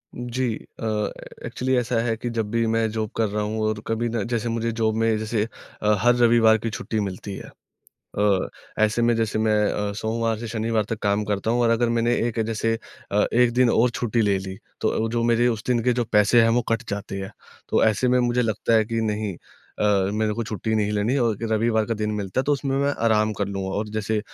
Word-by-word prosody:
जी, 120 -1 -2 0.2
अ, - - -4 0.6
actually 130 +1 -1
ऐसा 125 0 0
है 115 -1 0
कि 120 - -4
जब 110 -2 -1
भी 115 0 +1
मैं 115 0 +1
जॉब 110 -1 -2
कर 115 -1 +2
रहा 105 +1 -2
हूँ 110 +1 -3
और 110 -1 -1
कभी 115 +1 -1
ना, 115 -2 -1
जैसे 120 +1 -2
मुझे 115 0 -1
जॉब 110 -1 0
में 115 -1 +2
जैसे 110 0 -1 0.4
अ, 105 0 +3
हर 120 +1 +4
रविवार 115 -2 +5
की 115 +1 -3
छुट्टी 110 +1 -3
मिलती 100 0 -4
है। - - -9 0.7
अ, 100 -2 +2 0.4
ऐसे 110 +2 0
में, 120 0 +3
जैसे 110 -1 0
मैं 110 0 +2 0.2
अ, 105 0 -2
सोमवार 110 +1 -1
से 115 0 -6
शनिवार 110 -1 0
तक 115 - -3
काम 100 +1 +1
करता 105 +1 -1
हूँ 120 +1 +1
और 115 - +3
अगर 115 +1 +2
मैंने 120 +1 +2
एक 115 -1 -3
जैसे 115 0 0 0.4
अ, 105 +1 +3
एक 120 0 +4
दिन 125 0 +4
और 120 +2 +3
छुट्टी 115 0 -1
ले 100 -2 +2
ली, 95 0 -7 0.2
तो 115 - 0
जो 120 0 0
मेरे 120 +1 +3
उस 115 -2 -2
दिन 120 -2 +1
के 125 - +3
जो 120 0 0
पैसे 105 +3 +5
हैं, 115 - +4
वो 120 +2 +2
कट 115 +1 0
जाते 100 -1 -4
हैं। 95 - -7 0.4
तो - - +3
ऐसे 110 +3 +2
में 125 0 +3
मुझे 120 0 +1
लगता 110 0 0
है 110 -1 +4
कि, 115 +1 -2
"नहीं 105 -3 -2 0.4
अ, - - +2 0.3
मेरे 105 0 0
को 115 +2 -2
छुट्टी 110 +1 -2
नहीं 105 -1 +1
लेनी 105 +6 +1
और 115 -4 +1
रविवार 110 0 +2
का 115 - -1
दिन 105 0 -2
मिलता 100 +3 -1
है, - - -4
तो 145 - +2
उसमें 135 -1 -1
मैं 140 +1 +2
आराम 110 -1 +3
कर 100 - 0
लूँगा।" 95 -1 -3
और 105 +1 -2
जैसे 110 0 -1
110 Hz, 230 wpm, -24 LUFS, 105-120 Hz, 0.7 s, रविवार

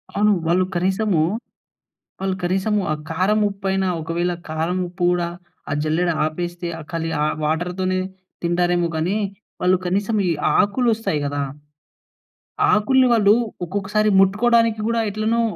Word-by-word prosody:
అవును. 210 +1 +3 0.2
వాళ్ళు 185 +2 +3
కనీసము 190 -1 +1 1.0
వాళ్ళు 190 -1 -1
కనీసము 190 +4 +1
ఆ - - +1 0.2
కారం, 185 +6 +1
ఉప్పైనా 195 -1 -1
ఒకవేళ 170 +2 -1 0.2
కారం 165 +4 -1
ఉప్పు 175 0 -4
గూడా, 175 -1 0 0.4
ఆ - - -1
జల్లెడ 160 +3 +1 0.2
ఆపేస్తే 175 +2 -4
ఆహ్, 155 - -9
కలి 165 0 -2
ఆహ్, 150 - +1
వాటర్‌తోనే 180 +4 -1 0.4
తింటారేమో 175 0 +1
కానీ, 175 +6 0 0.4
వాళ్ళు 185 +1 +3
కనీసం 200 +4 0
ఈ - - +2 0.3
ఆకులు 210 +4 +2
వస్తాయి 215 -9 -2
గదా! 145 0 -2 1.3
ఆకుల్ని 255 +5 +4
వాళ్ళు 210 -3 +5 0.3
ఒక్కొక్కసారి 205 +3 0
ముట్టుకోవడానికి 225 +3 +3
గూడా 230 0 +1
ఎట్లనో 220 +3 0
185 Hz, 125 wpm, -21 LUFS, 175-210 Hz, 1.3 s, వాళ్ళు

